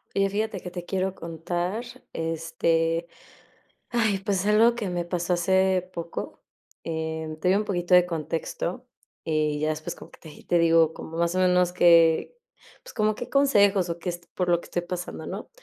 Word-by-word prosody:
Oye, 195 0 +3
fíjate 215 0 -2
que 180 0 -8
te 175 -1 -7
quiero 190 0 -1
contar, 175 +5 -3 0.3
este, 165 +1 0 0.8
ay, 225 -5 +1
pues, 195 -1 -1
algo 220 +3 +5
que 215 -6 -3
me 175 -1 -2
pasó 175 0 -1
hace 190 +1 +2
poco. 170 0 -6 0.4
Eh, 160 -1 -4
te 180 - +1
doy 190 - +4
un 210 - 0
poquito 180 -3 0
de 180 0 +7
contexto, 170 - -4 0.4
y 155 -2 0
ya 155 +1 +1
después 155 0 -4
como - - -13
que - - -18
te 160 - -12
y 150 - -14
te 175 - +2
digo, 165 -1 +4
como 160 0 -9
más 170 +1 +1
o - - 0
menos 180 -1 +3
que, 170 - +4 0.5
pues - - -12
como 215 0 +1
qué - - -7
consejos 205 -9 +4
o 170 0 -3
qué 175 +1 -3
est 175 0 -8
por 180 -1 0
lo 170 -1 +3
que - - -13
estoy 175 - -2
pasando, 180 0 -6
¿no? - - -6
175 Hz, 190 wpm, -26 LUFS, 165-190 Hz, 0.8 s, de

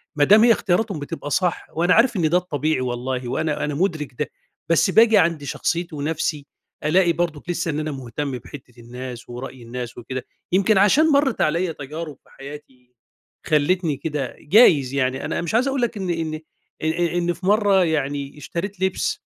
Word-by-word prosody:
ما 145 - +3
دام 210 +7 +6
هي 240 - +6
اختياراتهم 200 -3 +1
بتبقى 145 0 -6
صح. 180 +2 0
وأنا 175 +3 +3
عارف 235 +1 +4
إن 160 -3 +2
ده 175 - +4
الطبيعي 155 -5 -1
والله، 125 0 -3
وأنا 150 0 -1
أنا 150 -1 -3
مُدرِك 155 -5 -1
ده، 150 - 0 0.4
بس 165 +3 +3
باجي 220 +2 +6
عند 160 -3 +2
شخصيَّتي 170 +4 -2
ونفسي، 150 0 -2 0.4
ألاقي 170 +3 +3
برضَك 170 -1 -3
لسَّه 170 -1 -1
إن 150 - -2
أنا 155 0 -3
مهتم 135 +2 -5
بحتَّة 120 -1 -13
الناس 125 +1 -8
ورأي 125 +1 -8
الناس 120 +1 -6
وكده. 125 +2 -6 0.3
يمكن 195 +3 +3
عشان 280 +11 +5
مرَّت 280 -1 +2
عليَّا 170 +3 +1
تجارِب 150 0 -7
في - - -26
حياتي 135 -3 -12 0.5
خلَّتني 155 0 +1
كده، 145 -4 -4
جايِز 145 - +5
يعني. 130 0 -1
أنا 160 - -2
مش 170 - -4
عايِز 255 +4 +3
أقول 270 -2 -1
لك 235 -2 -1
إني 175 -4 -2
إني 155 -1 -5 0.4
إ - - -1
إ 170 +1 0
إن 175 0 0
في 180 - -10
مرَّة 200 -2 +4
يعني 145 -2 -2
اشتريت 185 +5 -5
لِبس 190 0 0
155 Hz, 180 wpm, -22 LUFS, 140-180 Hz, 0.5 s, دام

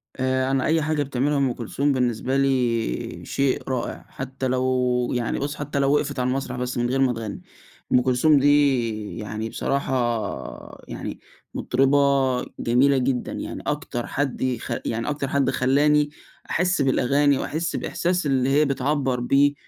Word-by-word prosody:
آآ، 130 0 0
أنا 135 -1 +1
أي 160 0 +2
حاجة 150 -1 0
بتعملها 140 +2 0
أم 135 -3 +1
كلثوم 140 +4 -1
بالنسبة 125 +1 0
لي 125 - 0
شيء 140 -1 0
رائع، 125 -2 -3
حتّى 130 0 -4
لو 125 -1 +1
يعني 120 -2 -1
بُص 145 +2 -3
حتّى 145 -1 -3
لو 140 +1 +3
وقفت 145 -2 -1
على 125 - +1
المسرح 130 -1 -2
بس 125 0 -3
من 120 0 0
غير 135 +1 0
ما 130 -2 +3
تغني، 110 -2 -6 0.5
أم 125 - +6
كلثوم 130 +4 +4
دي 130 -7 +2
يعني 110 +1 -4
بصراحة 120 -7 -2
يعني - - -6 0.3
مطربة 135 +3 +2 0.6
جميلة 135 +4 +3
جدًا، 130 -1 -1
يعني - - -6
أكتر 120 -1 -3
حد 140 -3 -2
يخ 125 -3 -2
يعني 115 +4 -2
أكتر 145 -2 -2
حد 140 -1 +1
خلّاني 145 +3 +3 0.4
أحس 180 -2 +1
بالأغاني، 140 +1 +3
وأحس 165 +3 -2
الإحساس 180 0 -1
اللي 135 -2 +2
هي 150 +2 +4
بتعبّر 135 -1 0
بيه 140 +4 +3
130 Hz, 150 wpm, -23 LUFS, 125-140 Hz, 0.6 s, أم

